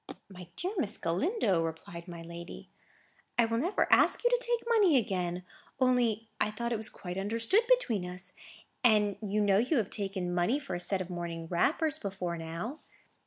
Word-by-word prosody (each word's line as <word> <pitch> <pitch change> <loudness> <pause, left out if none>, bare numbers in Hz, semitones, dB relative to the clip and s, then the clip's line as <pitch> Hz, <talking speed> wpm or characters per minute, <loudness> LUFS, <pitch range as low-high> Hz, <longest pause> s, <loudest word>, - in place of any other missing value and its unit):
"Dear 365 +2 -2
Miss 215 -6 0
Galindo," 190 - +1
replied 165 +1 -5
my 170 -1 -8
lady, 170 +1 -9 0.7
"I 235 - +5
will 230 0 0
never 350 +9 +1
ask - - +4
you 485 - +4
to - - +3
take 475 -1 -1
money 415 - +5
again. 180 -5 -1 0.4
Only 240 -4 +2
I - - +2
thought 235 +3 -3
it - - +1
was 215 0 -3
quite 180 0 -6
understood 230 - +2
between 250 - +3
us. 180 +1 -5 0.5
And 210 -4 +4
you 210 0 0
know 200 -1 +4
you 255 +7 +2
have 215 -5 0
taken 195 -3 -2
money 175 +10 +2
for 285 -2 -6
a - - -2
set 190 +1 0
of 180 0 -6
morning 170 -1 -4
wrappers, 300 - +1
before 190 -3 -3
now." 170 - -5
210 Hz, 175 wpm, -31 LUFS, 175-255 Hz, 0.7 s, I